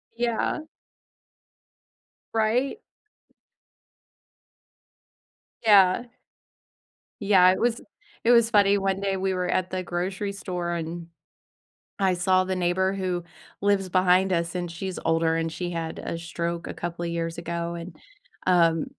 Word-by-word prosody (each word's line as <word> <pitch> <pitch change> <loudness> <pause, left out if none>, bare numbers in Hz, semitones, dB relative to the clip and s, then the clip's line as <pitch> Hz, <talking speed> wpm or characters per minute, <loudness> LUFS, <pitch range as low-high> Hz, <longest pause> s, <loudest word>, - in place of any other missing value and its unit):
Yeah. 235 +4 0 1.7
Right? 230 - +1 2.8
Yeah. 200 -2 +6 1.2
Yeah, 190 -3 +6
it 190 - -1
was 235 0 +1 0.4
it 235 - +4
was 235 -1 +5
funny, 205 -2 +4
one 195 -1 0
day, 195 -1 -1
we 190 0 -1
were 180 -1 -1
at 185 0 0
the 185 0 -2
grocery 185 +3 -3
store, 180 -3 -4
and 170 0 -4 0.9
I 190 -2 +3
saw 185 +1 +3
the 185 0 -2
neighbor 185 +1 +1
who 185 -2 -2 0.4
lives 200 -2 +2
behind 185 +1 +3
us, 170 0 -1
and 175 -1 -3
she's 185 +2 -5
older, 165 0 +2
and 165 0 -2
she 175 +1 -4
had 165 -2 -4
a 165 - -4
stroke 170 +1 -4
a - - -6
couple 175 0 -4
years 165 0 -3
ago, 170 0 -3
and, 170 +2 -8 0.5
um, 165 -3 +3
185 Hz, 125 wpm, -25 LUFS, 170-195 Hz, 2.8 s, Yeah